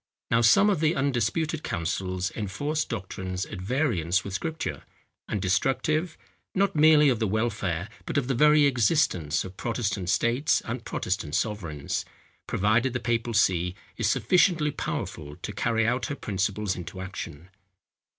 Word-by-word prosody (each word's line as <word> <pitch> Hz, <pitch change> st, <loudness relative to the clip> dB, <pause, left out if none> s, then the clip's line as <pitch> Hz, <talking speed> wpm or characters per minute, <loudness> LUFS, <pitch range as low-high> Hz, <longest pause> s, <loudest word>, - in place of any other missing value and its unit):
Now 115 Hz, 0 st, +4 dB
some 200 Hz, -, +6 dB
of 190 Hz, -, 0 dB
the 160 Hz, +2 st, +2 dB
undisputed 140 Hz, +4 st, 0 dB
councils 90 Hz, +3 st, -2 dB
enforce 145 Hz, +10 st, -2 dB
doctrines 95 Hz, -3 st, -4 dB
at 100 Hz, -4 st, -8 dB
variance 100 Hz, -, 0 dB
with 100 Hz, -, -6 dB
Scripture, 160 Hz, -, -3 dB, 0.5 s
and 105 Hz, -, -2 dB
destructive, 135 Hz, -, 0 dB, 0.4 s
not 195 Hz, -1 st, +2 dB
merely 150 Hz, -1 st, +6 dB
of 120 Hz, -4 st, +1 dB
the 110 Hz, -, +1 dB
welfare, 105 Hz, -5 st, -1 dB, 0.2 s
but -, -, -2 dB
of 135 Hz, -3 st, +1 dB
the 135 Hz, -, +1 dB
very 150 Hz, +3 st, +5 dB
existence, 120 Hz, -, +2 dB
of 95 Hz, 0 st, -10 dB
Protestant 110 Hz, -6 st, -2 dB
states 120 Hz, -, +2 dB
and 115 Hz, +1 st, -4 dB
Protestant 85 Hz, -9 st, -2 dB
sovereigns, 85 Hz, -8 st, -2 dB, 0.4 s
provided 115 Hz, +6 st, +2 dB
the 125 Hz, -, -1 dB
papal 115 Hz, 0 st, -1 dB
see 90 Hz, -3 st, +2 dB, 0.2 s
is -, -, 0 dB
sufficiently 170 Hz, -5 st, +3 dB
powerful 75 Hz, -, -5 dB
to 95 Hz, +5 st, -7 dB
carry 115 Hz, +2 st, +1 dB
out 125 Hz, +2 st, 0 dB
her 145 Hz, -, -3 dB
principles 100 Hz, -2 st, -1 dB
into 90 Hz, +1 st, -7 dB
action. 90 Hz, -3 st, -7 dB
110 Hz, 145 wpm, -27 LUFS, 95-145 Hz, 0.5 s, some